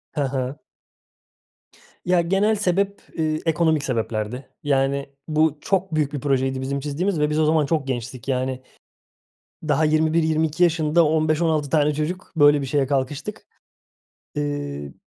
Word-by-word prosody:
He 145 - 0
he. 130 0 -2 1.5
Ya, 180 -1 +3
genel 195 +5 +2
sebep, 200 0 0 0.2
ııı, 155 -1 +1
ekonomik 160 -2 +2
sebeplerdi. 115 0 -3 0.2
Yani 140 -1 0 0.2
bu 155 -1 +2
çok 190 -3 0
büyük 150 -2 0
bir 145 - -2
projeydi 135 -1 0
bizim 140 +1 -2
çizdiğimiz 155 +6 -1
ve 150 0 +2
biz 150 +1 0
o 155 - +3
zaman 155 -1 +3
çok 150 -3 -1
gençtik. 125 0 -5
Yani 130 0 -1 1.1
daha 155 +3 +3
21-22 160 +1 +2
yaşında, 165 -1 +3
15-16 155 -1 +1
tane 150 -1 +2
çocuk 160 +5 -4
böyle 145 -1 +6
bir 140 - -3
şeye 135 +1 +1
kalkıştık. 145 +9 -3 0.9
Iıı, 145 - -4
150 Hz, 135 wpm, -23 LUFS, 135-160 Hz, 1.5 s, böyle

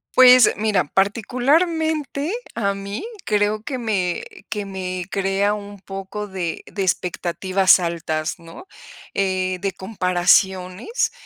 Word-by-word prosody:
Pues, 255 -1 +8
mira, 210 -5 +1
particularmente 285 - +1 0.2
a 200 -3 0
mí 200 - -6 0.2
creo 210 0 +1
que 260 +1 -4
me 195 -7 -1 0.3
que 205 -1 -3
me 185 -2 -4
crea 195 +1 +1
un 205 -1 -7
poco 195 +2 -6
de 180 -4 -4
de 200 - -4
expectativas 185 +1 +2
altas, 170 -2 -2
¿no? 170 - -12 0.5
Eh, 185 -1 0
de 195 -1 -1
comparaciones, 185 - +1
195 Hz, 110 wpm, -21 LUFS, 185-220 Hz, 0.5 s, Pues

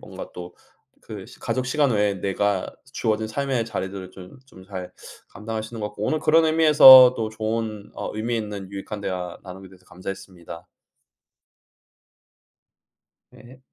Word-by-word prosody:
뭔가 - - -10
또 90 0 -9 0.5
그 - - -9
시 - - -16
가족 130 -1 -3
시간 140 0 +1
외에 105 -2 +1
내가 100 0 -1 0.3
주어진 110 -3 -1
삶의 130 0 -2
자리들을 95 -4 -6
좀 95 +4 -14
좀 95 -8 -16
잘 95 -2 -8 0.4
감당할 110 +2 -6
수 110 +2 -10
있는 115 - -7
것 105 - -2
같고 105 - -9
오늘 155 - 0
그런 160 +2 +3
의미에서 150 -5 +8
또 110 -1 -2
좋은 110 -1 -4
어 - - -5
의미 115 +2 -2
있는 105 -3 -6
유익한 100 +1 -7
대화 90 -3 -5
나누게 95 0 -11
돼서 95 0 -20
감사했습니다. 95 -2 -10 2.7
예. 130 +2 -18
105 Hz, 295 characters per minute, -23 LUFS, 95-120 Hz, 2.7 s, 의미에서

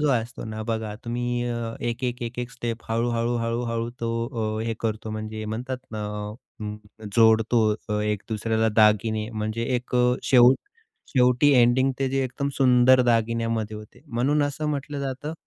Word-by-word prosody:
जो 150 - +2
असतो 120 -1 -2
ना 110 -1 -5
बघा 110 -2 -2
तुम्ही 120 +1 -2
अ, 115 -1 -3
एक, 120 +2 -3
एक, 125 0 -2
एक, 120 +1 -5
एक 125 0 -3
स्टेप 115 -2 -5
हळू, 115 +2 0
हळू, 115 +1 0
हळू, 115 +1 -1
हळू 115 0 -2
तो 115 - -1 0.5
अ, 110 - -2
हे 115 - -1
करतो 110 -1 -3
म्हणजे 110 0 -5
म्हणतात 120 +5 -4 0.2
ना 105 -1 -3 0.6
अ, 105 0 -8
जोडतो 115 +1 +5 0.3
अ, 105 -1 0
एक 105 -1 -1
दुसऱ्याला 110 +1 0
दागिने 110 0 +3
म्हणजे 110 +1 -3
एक 125 +1 -6
अ, 125 0 +4
शेवट 125 0 +6 0.5
शेवटी 125 +2 +4
एंडिंग 130 +1 +4
ते 135 - +1
जे 135 0 +1
एकदम 140 +2 -3
सुंदर 130 -1 +5
दागिन्यामध्ये 115 -2 0
होते. 105 +3 -13
म्हणून 135 +5 +2
असं 145 +2 -2
म्हटलं 145 0 -3
जातं 140 +3 -4
115 Hz, 170 wpm, -25 LUFS, 110-125 Hz, 0.6 s, शेवट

